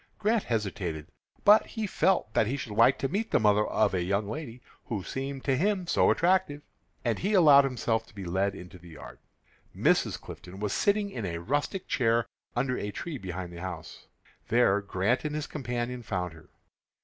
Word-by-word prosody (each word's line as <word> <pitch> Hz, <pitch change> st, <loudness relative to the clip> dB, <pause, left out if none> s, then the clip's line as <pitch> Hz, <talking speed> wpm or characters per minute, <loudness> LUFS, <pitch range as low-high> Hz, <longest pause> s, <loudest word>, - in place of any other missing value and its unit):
Grant 215 Hz, +1 st, +2 dB
hesitated, 95 Hz, -9 st, -3 dB, 0.4 s
but 210 Hz, +1 st, +8 dB
he 220 Hz, -2 st, -4 dB
felt 190 Hz, -, +1 dB
that 105 Hz, -, +3 dB
he 135 Hz, +5 st, -1 dB
should 120 Hz, -, -6 dB
like 115 Hz, +5 st, +4 dB
to 135 Hz, -, -1 dB
meet 205 Hz, +9 st, -2 dB
the -, -, +3 dB
mother 105 Hz, 0 st, +3 dB
of -, -, +1 dB
a 90 Hz, -, 0 dB
young 100 Hz, +3 st, 0 dB
lady 125 Hz, 0 st, -6 dB, 0.3 s
who 110 Hz, -9 st, -3 dB
seemed 135 Hz, +3 st, -5 dB
to 135 Hz, -, +1 dB
him 190 Hz, +4 st, 0 dB
so -, -, +3 dB
attractive, 170 Hz, -4 st, +2 dB, 0.4 s
and 115 Hz, -2 st, 0 dB
he 205 Hz, +3 st, 0 dB
allowed 145 Hz, -6 st, +7 dB
himself 115 Hz, -3 st, -1 dB
to 110 Hz, -, -20 dB
be 100 Hz, -2 st, -7 dB
led 95 Hz, +3 st, 0 dB
into 90 Hz, -1 st, -11 dB
the 85 Hz, 0 st, -14 dB
yard. 80 Hz, -, -11 dB, 0.6 s
Mrs. -, -, +2 dB
Clifton 90 Hz, +2 st, -10 dB
was 105 Hz, -1 st, -2 dB
sitting 205 Hz, 0 st, +1 dB
in 115 Hz, -, -5 dB
a 85 Hz, -1 st, -3 dB
rustic 145 Hz, -, -2 dB
chair 115 Hz, -2 st, +2 dB, 0.3 s
under 125 Hz, +1 st, 0 dB
a 105 Hz, -, -3 dB
tree 145 Hz, -, -6 dB
behind 90 Hz, -2 st, -6 dB
the 85 Hz, -, -8 dB
house. 90 Hz, -4 st, -8 dB, 0.4 s
There 110 Hz, -4 st, +3 dB
Grant 100 Hz, +5 st, 0 dB
and 150 Hz, -1 st, -3 dB
his 155 Hz, -1 st, -2 dB
companion 125 Hz, -3 st, -4 dB
found 90 Hz, -6 st, -3 dB
her. 80 Hz, -1 st, -16 dB
115 Hz, 190 wpm, -28 LUFS, 95-145 Hz, 0.6 s, but